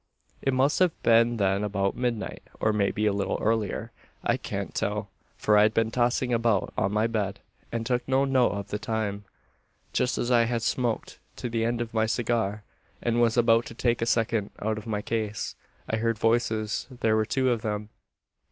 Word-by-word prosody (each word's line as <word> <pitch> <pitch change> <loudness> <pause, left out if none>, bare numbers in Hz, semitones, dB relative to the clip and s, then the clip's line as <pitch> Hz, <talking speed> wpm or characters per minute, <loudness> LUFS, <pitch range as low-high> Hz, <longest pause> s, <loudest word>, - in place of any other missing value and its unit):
"It 135 - +1
must 135 +4 +2
have 180 -3 +2
been 115 +1 +4
then 100 0 +1
about 100 -1 0
midnight, 120 -3 -2 0.2
or 110 - +2
maybe 105 +1 +1
a 105 - +3
little 100 -1 -1
earlier. 110 0 -1 0.3
I - - +2
can't - - -5
tell: 105 -1 -2 0.3
for 105 - +3
I'd 105 0 +4
been 115 0 +2
tossing 120 +1 +1
about 115 -4 +1
on 95 - +1
my 105 +1 +2
bed, 105 -4 -1 0.3
and 115 -1 -2
took 125 0 -1
no 135 +1 +3
note 130 -2 +3
of 100 0 -5
the 105 - -3
time. 105 -2 -2 0.7
"Just 125 - +1
as 120 - -1
I 120 -1 +5
had 115 -1 -1
smoked 120 -3 -1 0.2
to 125 - -4
the 115 -1 0
end 120 0 0
of 115 -1 -4
my 110 -1 +2
cigar, 110 -3 0 0.4
and 120 0 +1
was 115 0 +3
about 115 0 +4
to - - -9
take 120 -1 +1
a 115 - 0
second 110 -3 +1
out 110 +1 -2
of 110 - -12
my 105 -2 -2
case, 110 -2 -2 0.3
I 110 - 0
heard 115 0 0
voices. 110 -1 0
There 115 -4 +1
were 110 - +3
two 130 +2 +1
of 115 -2 0
them. 105 -1 -3
115 Hz, 195 wpm, -27 LUFS, 105-120 Hz, 0.7 s, I